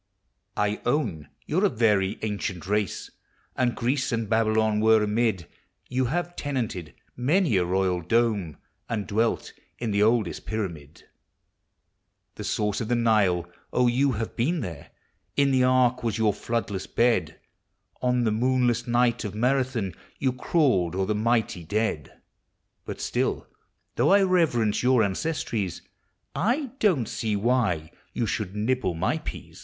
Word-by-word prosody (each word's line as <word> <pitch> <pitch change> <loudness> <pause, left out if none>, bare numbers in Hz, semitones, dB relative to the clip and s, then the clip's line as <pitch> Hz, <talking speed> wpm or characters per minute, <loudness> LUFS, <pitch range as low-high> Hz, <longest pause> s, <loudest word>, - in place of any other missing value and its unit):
I 105 +1 0
own 120 - -1 0.2
you 160 - 0
're - - +4
a - - +4
very 105 - +2
ancient 100 -5 -3
race, 105 -1 -1 0.4
And 125 -2 +1
Greece 130 +3 0
and 115 -2 -1
Babylon 110 0 +2
were 110 0 +5
amid; 105 -5 0 0.4
You 130 0 0
have 175 +6 -2
tenanted 115 - -3 0.2
many 145 - +2
a 90 - +2
royal 90 0 0
dome, 105 - 0 0.3
And 105 -3 -2
dwelt 110 +5 0 0.2
in 115 -3 -3
the 100 0 +1
oldest 110 -3 +1
pyramid; 85 -9 -5 1.3
The - - -8
source 105 -1 -1
of 110 - -3
the 120 - +1
Nile!— 105 -7 +3 0.3
6, 125 -1 +4
you 135 +2 +2
have 115 0 -4
been 155 +8 0
there! 80 -5 -7 0.5
In 140 -1 +4
the 130 -1 +3
ark 125 -1 +3
was 115 -3 -1
your 110 -2 +2
floodless 110 -5 -3
bed; 120 0 +1 0.6
On 125 -1 +2
the 110 - +2
moonless 120 +1 +1
nighl 120 -1 +2
of 105 -2 -5
Marathon 125 -3 0
Y - - -23 0.2
T - - -4
ou 130 - +3
crawled 125 - +1
o'er 95 0 0
the 105 - 0
mighty 110 -4 0
dead; 95 - -2 0.7
But - - -6
still, - - -1 0.5
though 125 - +3
1 195 +1 +5
reverence 135 - +2
your 125 -1 +4
anc<>stri<'s, 100 - -2 0.5
I 245 - 0
don't 160 - +2
see 110 -2 -2
why 105 -8 0 0.2
you 120 - -1
should 100 -2 -3
uibble 105 -4 0
mj 150 - -1
peas. 80 +2 -8
115 Hz, 150 wpm, -26 LUFS, 100-125 Hz, 1.3 s, were